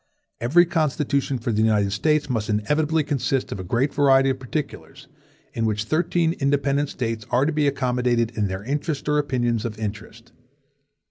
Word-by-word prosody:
Every 160 +10 +4
Constitution 145 -5 0
for 120 0 -3
the 110 0 +1
United 105 -3 +2
States 150 +8 +1
must 115 -5 -2
inevitably 150 +9 +1
consist 135 -2 -1
of - - -4
a - - -4
great 120 +10 0
variety 135 -2 +4
of 130 - -4
particulars, 140 +3 -6 0.5
in 115 -1 -1
which 105 0 -1
thirteen 165 +5 +1
independent 140 0 +1
States 115 -5 -3
are 125 +3 +2
to 160 - 0
be 150 -1 +2
accommodated 125 -3 0
in 105 -2 0
their 95 +1 -5
interests 145 +4 -3
or 150 0 +2
opinions 120 -5 0
of 115 -3 -5
interest. 110 +2 -7
130 Hz, 165 wpm, -23 LUFS, 115-145 Hz, 0.5 s, Every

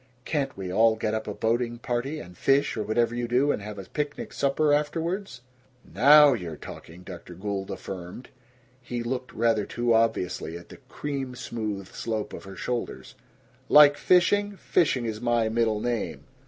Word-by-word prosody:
Can't 140 -6 -2
we 95 -2 -5
all 110 +2 +4
get 110 -1 -2
up 110 0 -3
a 105 - -3
boating 120 +1 0
party, 125 +5 -3
and 90 -10 -11
fish, 135 +8 +2
or 110 - -2
whatever 115 +2 +1
you 120 0 -2
do, 130 +5 +2
and - - -2
have 105 0 -7
a 100 - -6
picnic 150 +8 -4
supper 145 +2 +2
afterwards?" 165 +2 -2 0.4
"Now 145 - +7
you're 85 -9 -5
talking!" 85 +4 -11
Dr. 90 -1 -10
Gould 95 +1 -4
affirmed. 95 +3 -7 0.5
He 120 -1 -4
looked 125 +1 -4
rather 115 -2 +1
too 120 -1 0
obviously 95 -7 0
at 85 - -14
the - - -11
cream 135 -3 -4
smooth 105 -5 -4
slope 110 -2 -4
of - - -8
her 95 0 -9
shoulder. 115 - -4 0.7
"Like 145 -1 +8
fishing? 205 +4 +2
Fishing 140 -11 +1
is 110 -1 -4
my 120 -2 +1
middle 110 -1 +1
name. 120 -1 -3
120 Hz, 170 wpm, -26 LUFS, 105-140 Hz, 0.7 s, Like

